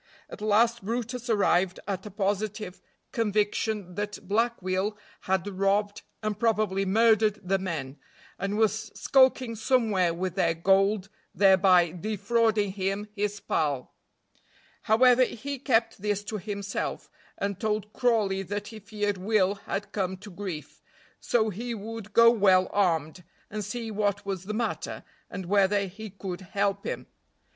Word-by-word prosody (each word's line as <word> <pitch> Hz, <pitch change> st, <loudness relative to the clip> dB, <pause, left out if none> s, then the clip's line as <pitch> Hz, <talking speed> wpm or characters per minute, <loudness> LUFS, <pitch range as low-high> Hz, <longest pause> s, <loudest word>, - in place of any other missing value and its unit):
At -, -, -9 dB
last 225 Hz, +2 st, +3 dB
brutus 240 Hz, +3 st, -3 dB
arrived 190 Hz, -4 st, +2 dB
at 195 Hz, 0 st, -3 dB
a -, -, -6 dB
positive 205 Hz, 0 st, -2 dB, 0.3 s
conviction 210 Hz, -3 st, 0 dB
that 205 Hz, 0 st, -5 dB
Black 230 Hz, +4 st, +1 dB
Will 190 Hz, +3 st, -1 dB, 0.2 s
had 190 Hz, +1 st, -1 dB
robbed 200 Hz, +1 st, 0 dB, 0.2 s
and 215 Hz, -1 st, -2 dB
probably 210 Hz, -4 st, +1 dB
murdered 215 Hz, 0 st, +4 dB
the 195 Hz, +1 st, +1 dB
men, 150 Hz, -7 st, -4 dB, 0.4 s
and 200 Hz, +1 st, -2 dB
was 215 Hz, -1 st, +1 dB
skulking 260 Hz, -3 st, +3 dB
somewhere 220 Hz, -6 st, +2 dB
with 180 Hz, +1 st, -3 dB
their 170 Hz, -3 st, +1 dB
gold, 195 Hz, +3 st, +2 dB, 0.3 s
thereby 190 Hz, -3 st, +5 dB
defrauding 210 Hz, +2 st, 0 dB
him, 195 Hz, +2 st, -2 dB
his 205 Hz, 0 st, -2 dB
pal; 145 Hz, -9 st, -1 dB, 0.9 s
however, 250 Hz, +3 st, +5 dB
he 270 Hz, +3 st, -4 dB
kept 230 Hz, -6 st, +1 dB
this 205 Hz, -1 st, -1 dB
to 210 Hz, 0 st, -4 dB
himself, 200 Hz, +1 st, -4 dB, 0.3 s
and 200 Hz, -1 st, -3 dB
told 215 Hz, -1 st, -2 dB
Crawley 215 Hz, -6 st, +1 dB
that 205 Hz, +2 st, -4 dB
he 220 Hz, -1 st, -9 dB
feared 205 Hz, -1 st, -2 dB
Will 200 Hz, -1 st, +2 dB, 0.2 s
had 200 Hz, +1 st, -3 dB
come 190 Hz, -2 st, -2 dB
to 205 Hz, +2 st, -11 dB
grief, 180 Hz, -4 st, -7 dB, 0.4 s
so 220 Hz, -2 st, +1 dB
he 235 Hz, +5 st, -4 dB
would 220 Hz, 0 st, -7 dB
go 230 Hz, +2 st, +7 dB
well 190 Hz, -5 st, +4 dB
armed, 170 Hz, -3 st, 0 dB, 0.3 s
and 210 Hz, 0 st, -3 dB
see 230 Hz, +2 st, -5 dB
what 205 Hz, -1 st, -1 dB
was 190 Hz, -2 st, -4 dB
the 215 Hz, +2 st, -4 dB
matter, 235 Hz, +1 st, -3 dB, 0.3 s
and 190 Hz, -2 st, -6 dB
whether 200 Hz, +2 st, +3 dB
he 210 Hz, +3 st, -8 dB
could 190 Hz, -2 st, -6 dB
help 200 Hz, +1 st, -1 dB
him. -, -, -4 dB
205 Hz, 140 wpm, -27 LUFS, 190-220 Hz, 0.9 s, go